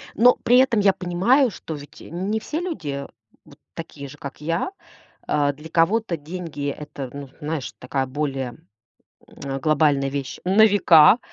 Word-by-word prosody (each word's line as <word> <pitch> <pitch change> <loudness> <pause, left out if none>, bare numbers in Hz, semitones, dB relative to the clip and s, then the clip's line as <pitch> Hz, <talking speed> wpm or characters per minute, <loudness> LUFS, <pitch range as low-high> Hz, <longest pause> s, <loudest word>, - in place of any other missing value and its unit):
Но 245 +3 +6
при 245 - +5
этом 255 -4 +4
я 195 -1 +4
понимаю, 195 +10 +2
что 160 - -7
ведь, 145 0 -12
э, - - -11
не 190 +6 -2
все 305 +8 -4
люди 145 - -4 0.4
вот - - -18
такие 150 -4 -8
же, 145 +2 -12
как 140 +1 -9
я. 165 - -1 0.6
Э, 145 -1 +1
для 150 +3 -12
кого-то 175 +3 +1
деньги- 155 -2 -5
это, 140 -2 -7
ну, 140 -1 -8
знаешь, 150 -2 -4
такая 130 +1 -2
более, 135 -2 -3 0.7
м, 135 -1 -6
глобальная 145 -2 +2
вещь 140 -1 -4
на 195 +4 +5
века. 185 -1 +6
155 Hz, 160 wpm, -23 LUFS, 140-195 Hz, 0.7 s, Но